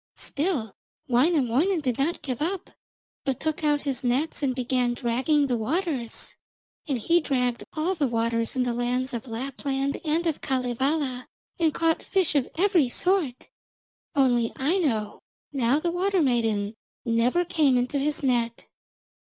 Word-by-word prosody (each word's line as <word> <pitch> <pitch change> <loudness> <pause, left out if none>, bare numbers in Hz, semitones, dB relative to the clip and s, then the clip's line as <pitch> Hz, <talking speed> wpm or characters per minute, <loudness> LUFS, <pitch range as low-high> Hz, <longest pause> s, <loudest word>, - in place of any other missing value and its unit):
Still 285 - -2 0.3
Wainamoinen 290 +5 +3
did 255 -5 -2
not 315 +5 0
give 255 -2 -3
up, 360 +4 -2 0.5
but 270 -3 -1
took 315 0 -2
out 295 -1 +2
his 275 -3 -3
nets 260 +7 0
and 265 -3 0
began 250 -1 0
dragging 260 +5 +1
the 245 -4 0
waters. 270 - -2 0.5
And 275 -4 0
he 335 +10 +3
dragged 250 -5 0
all 325 +4 0
the 305 -6 0
waters 230 0 0
in 255 - +2
the 245 -1 -1
lands 250 +2 -1
of 235 +1 -4
Lapland 270 +3 -3
and 325 +2 0
of 320 -3 -1
Kalevala, 260 +1 -1 0.3
and 325 -2 +3
caught 325 +1 +1
fish 380 -5 +1
of 280 -4 +1
every 350 -7 +3
sort, 345 -4 0 0.7
only 245 -4 +3
Aino, 265 - 0 0.3
now 260 0 +2
the 340 +3 -1
water 370 0 +1
maiden, 225 -5 +1 0.3
never 245 +9 +2
came 300 -7 +3
into 250 +3 0
his 295 +1 -1
net. 235 -3 0
270 Hz, 145 wpm, -26 LUFS, 245-315 Hz, 0.7 s, Wainamoinen